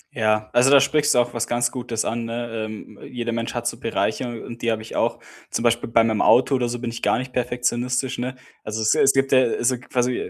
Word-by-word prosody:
Ja, 110 -2 +1
also 125 +2 +5
da 140 0 +8
sprichst 145 +1 +2
du - - +5
auch 120 0 0
was 120 -1 -2
ganz 120 0 0
Gutes 120 -3 -3
an, 115 0 -2
ne? 115 -1 -4
Ähm, 110 -1 -10
jeder 120 -1 -4
Mensch 115 +1 -3
hat 120 -1 -3
so 115 - -3
Bereiche 115 0 -2
und 120 0 -9
die 115 - +1
habe 110 -1 -3
ich 110 - -9
auch. - - 0 0.3
Zum - - -2
Beispiel 120 0 +1
bei 115 0 +4
meinem 110 -1 +1
Auto 130 +3 +4
oder 125 -2 +1
so 120 - -3
bin 120 -1 -4
ich 115 - -7
gar - - +2
nicht 130 +1 -6
perfektionistisch, 125 +1 -1
ne? 125 +2 -3 0.3
Also, 110 +1 -3
es 110 - +3
es 135 - +4
gibt 135 0 +1
ja, 130 - +6
also 120 +1 +1
quasi 125 0 -2
120 Hz, 245 wpm, -22 LUFS, 115-125 Hz, 0.3 s, da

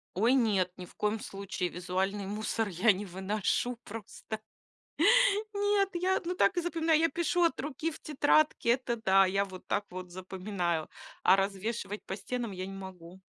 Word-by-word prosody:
Ой, 225 +7 +4
нет, 205 -8 +2
ни 180 - -7
в - - -18
коем 210 +1 0
случае! 195 -2 -4
Визуальный 190 +3 -2
мусор 215 +2 -1
я 200 +4 +4
не 200 +1 -3
выношу 200 +6 -1
просто! 220 0 -7 1.1
Нет, 405 -1 +2
я, 370 +2 +1
ну, 360 +1 -2
так 380 +1 +3
и - - +3
запоминаю. 330 -2 +2
Я 330 +1 +3
пишу 345 +3 +1
от 335 - +2
руки 300 +3 -3
в 310 - -10
тетрадке, 300 -2 +2
это 245 -1 0
да, 195 -3 +5
я 195 +2 +1
вот 185 -2 -11
так 205 - 0
вот 185 0 -7
запоминаю, 185 -3 -3 0.3
а - - +7
развешивать 200 +2 -2
по 190 - -4
стенам 235 +3 -4
я 185 -1 -5
не 195 - -7
могу. 185 -2 -10
205 Hz, 170 wpm, -30 LUFS, 190-270 Hz, 1.1 s, а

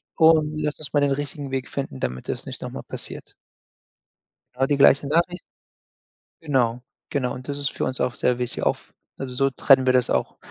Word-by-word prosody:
Und 160 -2 +5
lass 150 -1 -2
uns 150 -2 -8
mal 145 - +4
den 140 -1 +2
richtigen 145 0 -3
Weg 130 -1 -2
finden, 135 - -5
damit 65 0 -4
das - - -3
nicht - - -7
noch - - -4
mal - - -7
passiert." - - -6 1.2
Genau 130 +2 +1
die 145 +1 +1
gleiche 140 0 +5
Nachricht 170 +4 +1 1.0
Genau, 125 -5 +1 0.3
genau. 125 -3 0
Und 130 +2 -9
das 145 0 -3
ist 140 - -1
für - - -2
uns 130 - -3
auch 125 - 0
sehr 125 -1 +1
wichtig 125 -1 -3
auf - - -1 0.2
also, 130 -2 -5
so 135 +1 +2
trennen 130 0 +5
wir 130 - +4
das 125 -1 +3
auch - - 0
135 Hz, 200 wpm, -24 LUFS, 125-145 Hz, 1.2 s, Und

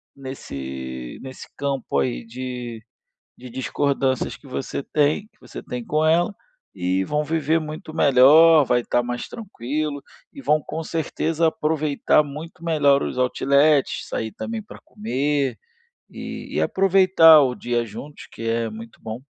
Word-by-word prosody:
nesse 65 - -7
nesse 130 -1 -9
campo 135 - -1
aí, - - -2
de 125 -1 -6 0.6
de 125 0 -11
discordâncias 135 +1 -1
que 145 - -17
você 130 +1 -4
tem 150 +8 +1
que 215 -1 -38
você - - -9
tem 125 -1 -5
com 155 +4 0
ela 170 +5 +3 0.4
e 90 +2 0
vão 150 +9 -1
viver 160 +1 +1
muito 155 +1 -7
melhor, 155 +3 +7
vai 120 -1 +2
estar 120 0 0
mais 120 0 -4
tranquilo, 150 - -4 0.3
e 280 - -10
vão 155 - +3
com 160 +3 -5
certeza 165 0 -1
aproveitar 150 -1 +1
muito 155 +3 -9
melhor 145 -4 +3
os - - -4
outlets, 140 +3 +2
sair 110 -1 -3
também 225 - -5
pra 210 - -13
comer 145 - -1 0.5
e - - -8
e - - +1
aproveitar 185 -5 +6
o 130 -3 +1
dia 120 -1 -1
juntos 115 +7 -10
que - - -9
é 115 0 0
muito 110 +1 -11
bom. 110 +1 -6
140 Hz, 145 wpm, -22 LUFS, 120-155 Hz, 0.6 s, melhor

